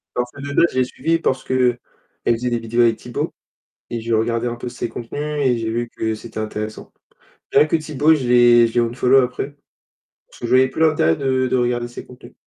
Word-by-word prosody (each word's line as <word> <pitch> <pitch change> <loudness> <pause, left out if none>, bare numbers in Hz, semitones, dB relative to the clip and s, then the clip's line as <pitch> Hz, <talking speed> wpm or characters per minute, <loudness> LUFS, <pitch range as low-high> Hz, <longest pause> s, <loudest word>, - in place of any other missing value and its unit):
Parce 125 0 -2
que 140 - -14
Leleu 140 +4 +2
je - - -6
l'ai 130 - +3
suivi 165 +5 -1
parce 130 -5 -1
qu'elle 125 -2 +1 0.5
faisait 120 +1 +1
des 120 - 0
vidéos 115 +1 0
avec 115 -1 +4
Tibo 120 0 -4 0.6
et 120 - -3
j'ai 115 0 -3
regardé 115 +2 0
un 120 - -3
peu 120 - -6
ses 120 - -4
contenus 115 +4 -6 0.2
et 125 -2 +2
j'ai 115 -1 -3
vu 120 +1 -2
que 110 0 -3
c'était 110 0 -8
intéressant. 110 0 -6 0.6
Rien - - +6
que 165 - +2
Tibo, 155 0 +2
je 135 -5 -1
l'ai 120 -1 +6
je 115 - -9
l'ai 120 - +2
unfollow 125 +3 +3
après 130 +3 -4 0.7
parce - - -18
que - - -5
je - - -6
voyais 130 +1 +5
plus 130 - -5
l'intérêt 150 - +3
de 130 -1 0
de 130 - 0
regarder 120 -1 0
ses 120 - -10
contenus. 125 - -14
120 Hz, 220 wpm, -20 LUFS, 115-130 Hz, 0.7 s, Rien